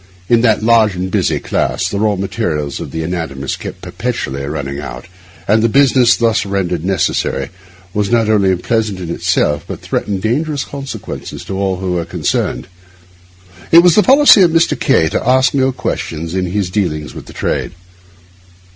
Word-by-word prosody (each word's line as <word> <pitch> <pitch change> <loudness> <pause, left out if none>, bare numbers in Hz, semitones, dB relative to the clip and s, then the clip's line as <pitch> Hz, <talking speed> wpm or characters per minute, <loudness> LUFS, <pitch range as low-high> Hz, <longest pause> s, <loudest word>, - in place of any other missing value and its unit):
In 120 -1 +3
that 110 -3 +2
large 110 -3 +4
and 95 +1 -4
busy - - +1
class, - - -1
the 100 - -3
raw 105 -1 +1
material 95 -5 -2
of - - -6
the 80 - -4
anatomists 80 -6 -4
kept - - -9
perpetually 70 +1 -4
running 70 -1 -4
out; 60 -4 -7 0.4
and 110 +2 +3
the 115 - +2
business 130 -1 +4
thus 115 -1 +1
rendered 95 -5 -2
necessary 95 -2 -1 0.4
was 105 -1 -1
not 115 -2 +2
only 100 -3 +3
unpleasant 105 +1 -1
in 85 -2 -5
itself, 75 -3 0
but - - -6
threatened 100 -2 -3
dangerous 145 +5 -1
consequences 140 -1 -7
to 95 - -5
all 95 -1 0
who 95 0 -3
were 85 -2 -1
concerned. - - -2 1.1
It 170 +1 +8
was 180 -2 +6
the 210 - +5
policy 270 -3 +6
of 180 - +6
Mr. 165 +1 +2
K— 110 - +3
to - - -2
ask 130 0 +3
no 135 -1 +2
questions 85 -9 -4
in 95 -1 -1
his 95 0 -2
dealings 75 -7 -2
with - - -10
the - - -10
trade. - - -2
100 Hz, 175 wpm, -15 LUFS, 85-120 Hz, 1.1 s, It